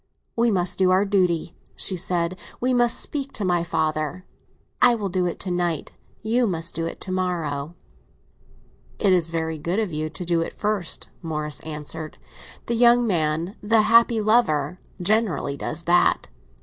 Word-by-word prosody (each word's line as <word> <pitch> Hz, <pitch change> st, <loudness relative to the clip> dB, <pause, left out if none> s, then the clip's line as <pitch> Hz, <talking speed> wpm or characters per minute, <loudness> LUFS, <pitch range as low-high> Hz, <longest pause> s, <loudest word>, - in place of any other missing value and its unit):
"We 235 Hz, +1 st, +3 dB
must 180 Hz, -4 st, 0 dB
do 185 Hz, -1 st, +4 dB
our 185 Hz, +2 st, +4 dB
duty," 180 Hz, -4 st, +1 dB, 0.2 s
she 190 Hz, -, -2 dB
said; 175 Hz, 0 st, -1 dB, 0.2 s
"we 255 Hz, +1 st, +1 dB
must 240 Hz, -1 st, +3 dB
speak 280 Hz, -2 st, -1 dB
to 205 Hz, -, -2 dB
my 175 Hz, -2 st, +1 dB
father. 160 Hz, +2 st, -2 dB, 0.6 s
I 240 Hz, -, +6 dB
will 205 Hz, -4 st, -3 dB
do 180 Hz, 0 st, 0 dB
it 175 Hz, -, -4 dB
to 185 Hz, -, -3 dB
night; 175 Hz, -3 st, -1 dB, 0.3 s
you 235 Hz, +2 st, +2 dB
must 170 Hz, -2 st, -3 dB
do 165 Hz, +1 st, -2 dB
it -, -, -7 dB
to 185 Hz, -, -6 dB
morrow." 170 Hz, -5 st, -2 dB, 1.2 s
"It 195 Hz, -2 st, +3 dB
is 170 Hz, -3 st, +3 dB
very 160 Hz, -1 st, -2 dB
good 170 Hz, +6 st, -2 dB
of 215 Hz, -7 st, -1 dB
you 155 Hz, +1 st, -2 dB
to 180 Hz, +3 st, -7 dB
do 170 Hz, -1 st, +1 dB
it 165 Hz, -, -4 dB
first," 205 Hz, -5 st, -1 dB
Morris 150 Hz, -3 st, -3 dB
answered. 155 Hz, 0 st, -5 dB, 0.5 s
"The 235 Hz, -, -1 dB
young 240 Hz, +1 st, +5 dB
man—the 185 Hz, +5 st, +1 dB
happy 230 Hz, +1 st, +5 dB
lover—generally 180 Hz, -, 0 dB
does 165 Hz, +4 st, -4 dB
that. 175 Hz, +1 st, +3 dB
180 Hz, 160 wpm, -23 LUFS, 160-210 Hz, 1.2 s, I